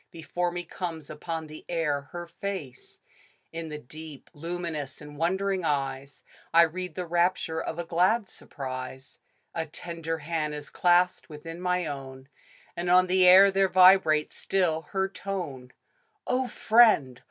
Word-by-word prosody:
Before 175 +2 -3
me 175 0 -4
comes 165 -3 -6
upon 160 +1 -5
the 155 0 -11
air 150 -5 -1
her 175 0 -6
face. 170 -8 -7 0.5
In 165 -1 -5
the 150 - -5
deep, 150 +1 -11
luminous 165 -3 -5
and 150 -1 -11
wondering 190 +4 0
eyes 140 -2 -2 0.3
I 170 +1 +7
read 175 0 -3
the 180 - -3
rapture 170 -1 0
of 160 - -5
a 175 - -2
glad 185 +6 +2
surprise; 130 -4 -8 0.3
A 165 -1 -3
tender 165 0 -5
hand 155 -1 -3
is 145 0 -9
clasped 180 0 +2
within 165 +3 -9
my 180 -1 0
own, 135 -2 -7 0.5
And 175 +1 -3
on 180 +1 +6
the 185 0 +4
air 195 +2 +9
there 195 0 +2
vibrates 185 -5 +5
still 160 -5 0
her 190 0 0
tone. 175 -11 -6 0.5
O 255 0 0
Friend 215 - +4
165 Hz, 145 wpm, -27 LUFS, 150-180 Hz, 0.5 s, air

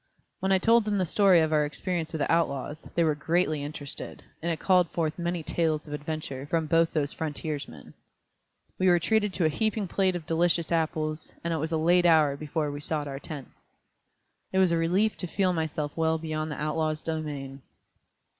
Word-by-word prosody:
When 190 0 0
I 190 - +6
told 230 +3 +4
them 210 -1 0
the 185 - +1
story 190 -1 +5
of 160 0 +1
our 150 -1 +4
experience 165 +2 -3
with 160 - -3
the - - +1
outlaws, 155 -2 -1
they 170 - +3
were 155 -2 +3
greatly 155 0 0
interested, 145 -1 -7 0.2
and 170 +1 -1
it 160 - -3
called 180 -3 +3
forth 160 +1 -2
many 175 -1 -2
tales 155 -2 0
of 150 - -8
adventure 150 -2 -5
from 165 +1 0
both 165 +1 +3
those 145 -3 -1
frontiersmen. 150 - -5 0.9
We 185 - +3
were 175 -1 +6
treated 210 +4 +1
to 180 - +1
a - - +4
heaping 215 +5 -1
plate 185 +1 +1
of 170 -3 -5
delicious 170 +1 +1
apples, 155 -1 -1
and 170 0 -1
it - - 0
was 160 +2 -3
a 160 - +1
late 175 +2 +4
hour 155 -4 +5
before 150 0 -2
we 145 0 -6
sought 150 -1 -2
our 135 -1 -5
tents. 145 -4 -9 0.9
It 190 - -1
was 190 -2 +4
a - - +3
relief 185 +6 +1
to 180 - -4
feel 185 +2 +1
myself 155 -3 -2
well 160 0 +1
beyond 155 -1 -3
the 150 - -5
outlaws' 155 +1 -1
domain. 145 -4 -4
160 Hz, 200 wpm, -27 LUFS, 150-175 Hz, 0.9 s, I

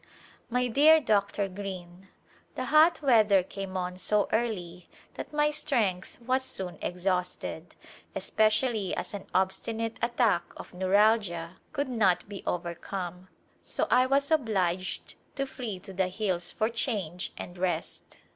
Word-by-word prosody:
My 250 +1 +1
dear 300 +6 +6
Dr. 200 -5 +1
Greene: 185 -1 -7 0.5
The - - -3
hot 315 +1 +6
weather 215 -7 +5
came 190 0 -6
on 180 0 -3
so 210 +1 +2
early 180 -7 -2 0.2
that - - -7
my 300 0 +2
strength 210 -11 0
was 255 +2 0
soon 190 -8 -3
exhausted, 180 0 -2 0.4
especially 215 -2 +1
as - - -5
an 200 -1 -6
obsti 190 +4 0
nate 225 0 -3
attack 235 -6 +2 0.2
of - - -10
neuralgia 185 -2 +2
could 285 0 -1
not 210 -9 +2
be 200 -1 -7
overcomic, 175 +1 -4 0.3
so - - -1
I 255 +1 +5
was 280 +2 +2
obliged 190 - 0 0.2
to 275 - -1
flee 245 -7 -5
to 195 - -9
the 190 0 +1
hills 185 -3 -1
for 220 +3 0
change 200 - -3
and 175 - -7
rest. 175 -3 -3
200 Hz, 135 wpm, -29 LUFS, 180-235 Hz, 0.5 s, dear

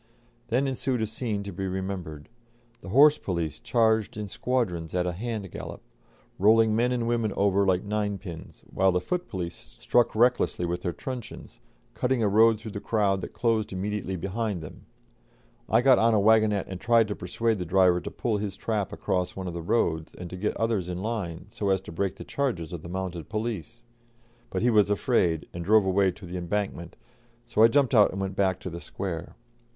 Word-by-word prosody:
Then 125 +4 +1
ensued 130 -3 -1
a - - +2
scene 110 -2 -3
to 100 -1 -7
be 95 +2 -3
remembered; 95 -5 -5 0.5
the - - -9
horse 145 +7 +6
police 85 -5 -3
charged 110 -3 +1
in 105 -1 -4
squadrons 90 -8 -2
at 90 -1 +1
a 90 - 0
hand 105 0 -5
gallop, - - -7 0.6
rolling 110 +2 +5
men 120 +2 +2
and 120 -2 -1
women 115 -3 0
over 100 0 +2
like 90 -1 +2
ninepins, 100 -5 -4
while 95 0 +3
the 90 - +1
foot 180 - -3
police 85 -2 -4
struck 120 -2 0
recklessly 120 -6 +2
with 85 +1 -2
their 90 - -1
truncheons, 125 - -8 0.3
cutting 125 -2 0
a - - +3
road 110 +2 +5
through 110 0 -8
the 100 - -5
crowd 100 -3 +1
that - - -7
closed 115 -3 0
immediately 95 0 -3
behind 100 0 -3
them. 75 - -11 0.8
I 115 - +4
got 130 0 +6
on 115 0 +4
a - - +4
waggonette 110 -1 +4
and 95 -1 -7
tried 115 -1 +4
to 105 - -2
persuade 110 +4 -1
the 90 - -3
driver 90 -1 +4
to - - -5
pull 110 -3 -1
his 100 -2 -4
trap 105 -2 -2
across 90 -3 -2
one 95 - -5
of 90 - -4
the 85 - -4
roads, 80 -5 0
and 90 -1 -8
to - - -5
get 100 +3 -2
others 110 -5 0
in 90 +1 -4
line, 100 -8 -3
so 105 -2 -3
as 95 0 +3
to 95 - -10
break 95 +3 -2
the - - -9
charges 95 - -2
of 85 - -5
the 85 - -9
mounted 90 -2 -5
police; 115 +1 -4 0.7
but - - -2
he 120 - +4
was 105 -2 +4
afraid, 100 - +1
and 85 - -5
drove 105 +2 +4
away 95 0 +3
to 100 +1 -12
the 90 +1 -6
Embankment, 90 -1 -3 0.5
so 115 -2 0
I 115 - +9
jumped 140 +2 +2
out 105 -4 +6
and 95 - -5
went 95 0 -3
back 95 -2 +1
to 90 - -5
the 85 +1 -7
Square. 85 -4 -5
100 Hz, 200 wpm, -27 LUFS, 90-115 Hz, 0.8 s, I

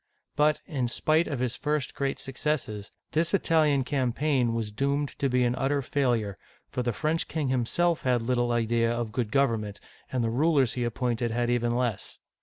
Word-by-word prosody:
But, 150 0 +3
in 135 -7 -1
spite 155 +7 +1
of 140 - -2
his 125 -1 -1
first 150 -2 -1
great 140 -1 -2
suc 135 - -5
cesses, 120 -9 -2 0.2
this 165 +3 +2
Italian 155 -6 +3
campaign 130 -1 +1
was 110 -2 -2
doomed 140 +5 0
to 140 - +1
be 125 0 +2
an 120 0 +2
utter 135 +2 0
failure, 120 -7 0 0.3
for 125 - -1
the 120 -1 0
French 155 +7 -1
king 155 -4 -2
himself 155 +7 +1
had 125 -3 +1
little 120 0 +1
idea 115 0 +1
of 120 -2 -2
good 115 -2 -2
government, 115 -7 +1 0.3
and 125 -2 0
the 115 - 0
rulers 140 -1 +3
he 125 -1 -1
appointed 120 0 -1
had 120 +1 0
even 120 -1 +1
less. 120 -5 -2
125 Hz, 185 wpm, -27 LUFS, 120-145 Hz, 0.3 s, But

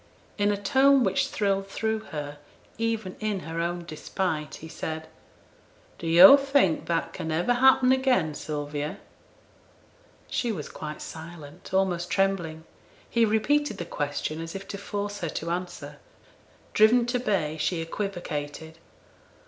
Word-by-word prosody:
In 205 0 +3
a 205 - 0
tone 265 +6 +4
which 190 -3 +1
thrilled 195 -1 0
through 220 +2 -1
her, 145 -3 -6 0.4
even 225 -4 -1
in 210 -3 -2
her 165 0 -4
own 175 0 -2
despite, 155 -1 -3
he 160 - -10
said, 160 0 -5 0.9
'Do 165 - -5
yo' 180 +11 +10
think 275 - +2
that 165 -1 -1
can 165 -3 -4
ever 175 +10 +2
happen 255 0 +5
again, 255 - +2
Sylvia?' 145 0 -4 1.3
She 240 - -1
was 160 -9 -5
quite 150 0 -7
silent; 160 -2 -10
almost 180 -2 +1
trembling. 175 -5 0 0.4
He 235 -1 +3
repeated 225 +3 +1
the 175 - -4
question 150 +1 -3
as 165 +2 -7
if 195 0 -7
to 200 - -5
force 205 0 -4
her 170 - -3
to 165 +2 -4
answer. 175 0 -5 0.7
Driven 235 +3 +5
to 245 +1 0
bay, 175 -10 0
she 160 +3 0
equivocated. 165 -3 -5
180 Hz, 140 wpm, -27 LUFS, 160-215 Hz, 1.3 s, yo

